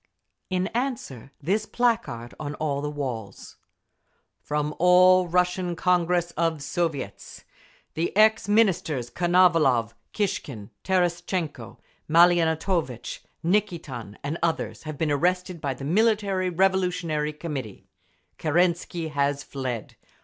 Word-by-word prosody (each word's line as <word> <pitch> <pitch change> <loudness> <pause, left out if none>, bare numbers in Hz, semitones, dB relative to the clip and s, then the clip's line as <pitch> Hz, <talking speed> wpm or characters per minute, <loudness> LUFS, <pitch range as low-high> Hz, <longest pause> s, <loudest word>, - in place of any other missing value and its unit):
In 185 -1 0
answer, 230 - -4
this 210 +7 0
placard 230 - -1
on 145 -1 -4
all 145 -2 -2
the 150 - -2
walls: 125 -9 -6 0.8
FROM 150 0 -1
THE - - -10
ALL 180 +1 +6
RUSSIAN 180 0 0
CONGRESS 175 0 +1
OF 165 -3 -1
SOVIETS 145 - -4 0.5
"The 170 +4 -2
ex 220 -1 +4
Ministers 165 - +2
Konovalov, 165 - +3 0.2
Kishkin, 135 - -3
Terestchenko, 175 - -1 0.3
Maliantovitch, 165 - +2 0.3
Nikitin 165 - -1
and 150 +4 -3
others 165 -1 -1
have 155 - -5
been 155 0 0
arrested 180 +3 0
by 135 -2 -2
the 135 - -7
Military 200 +1 +2
Revolutionary 180 -4 +1
Committee. 145 - -6 0.5
Kerensky 170 0 0
has 140 0 0
fled. 130 -5 -5
170 Hz, 105 wpm, -25 LUFS, 145-185 Hz, 0.8 s, ALL